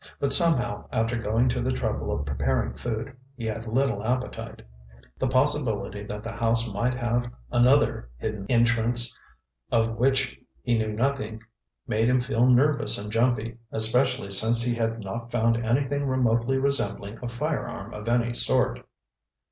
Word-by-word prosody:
But 140 -1 +2
somehow, 140 - +3
after 115 +2 0
going 115 +2 +1
to - - -1
the - - -1
trouble 65 0 -2
of 70 - -2
preparing 65 -2 -1
food, 120 +3 -5 0.2
he 115 - -6
had 110 +1 -4
little 120 -3 0
appetite. 125 +3 -3 0.6
The - - +1
possibility 120 -7 0
that 105 +1 -6
the 115 - -5
house 115 -1 +2
might 120 +5 0
have 120 0 -1 0.2
another 125 - +3
hidden 105 - -5
entrance 120 0 +2 0.6
of 115 -1 +1
which 135 +2 +1 0.2
he 120 - +1
knew 110 -1 -1
nothing 110 -2 -2 0.4
made 110 +2 +1
him 125 0 +3
feel 125 -1 +1
nervous 140 +4 +3
and 105 +1 -6
jumpy, 115 0 0
especially 115 0 +2
since 115 +4 +2
he 120 0 0
had 115 -1 -2
not 115 +4 -6
found 115 -1 +1
anything 140 +4 0
remotely 125 0 +1
resembling 130 -6 -1
a 125 - -4
firearm 120 -5 -4
of 105 +2 -6
any 120 0 +1
sort. - - +3
115 Hz, 150 wpm, -26 LUFS, 110-125 Hz, 0.6 s, somehow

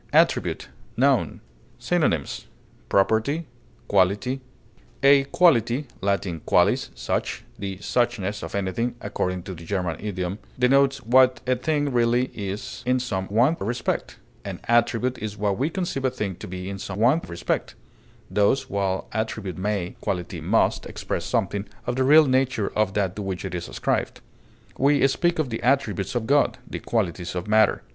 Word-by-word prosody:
ATTRIBUTE, - - +2 0.3
n. - - +2 0.4
Synonyms: - - 0 0.4
property, 110 +11 +2 0.4
quality. 105 +7 +2 0.6
A 140 0 +6
quality 140 - +3 0.2
(L. 100 0 +2 0.2
qualis, - - +2
such) - - -2 0.2
the 95 -2 -4
"suchness" 105 -2 -1
of 80 - -6
anything, 115 +5 -1
according 90 -3 -2
to 95 - -6
the 85 -1 -10
German 90 -2 -2
idiom 95 -1 -3 0.2
denotes 135 +2 +3
what 130 +1 +5
a 130 0 +2
thing 145 +2 0
really 120 +1 +2
is 100 0 -5
in 130 0 +3
some 95 -7 -3
one 120 +10 +3
respect; 115 +4 -2 0.3
an - - -6
attribute 120 +2 +2
is 105 0 -5
what 100 -1 0
we 145 - +1
conceive 170 -6 -3
a - - +4
thing 105 -6 -3
to - - -8
be 90 +1 -6
in 100 0 -5
some 95 0 -6
one 125 +9 +4
respect; 85 0 -2 0.5
thus, 105 +8 +1
while 95 -1 -1
attribute 110 -4 -3
may, 100 -3 -2
quality 90 -2 -3
must, - - +1
express - - -4
something 100 0 -1 0.2
of 120 -1 -1
the 130 - +2
real 150 +4 +7
nature 130 -5 +1
of 105 -2 +1
that 95 -3 0
to 105 - -5
which 95 -2 -4
it 95 - -5
is 90 -1 -4
ascribed; - - -1 0.6
we 140 0 +4
speak 175 +5 +1
of 150 -6 -1
the 115 - -3
attributes 120 -6 +1
of 120 -2 0
God, 140 +4 +3
the - - -5
qualities 90 -6 -2
of 90 +1 -3
matter. 110 -1 +3
110 Hz, 155 wpm, -24 LUFS, 95-130 Hz, 0.6 s, real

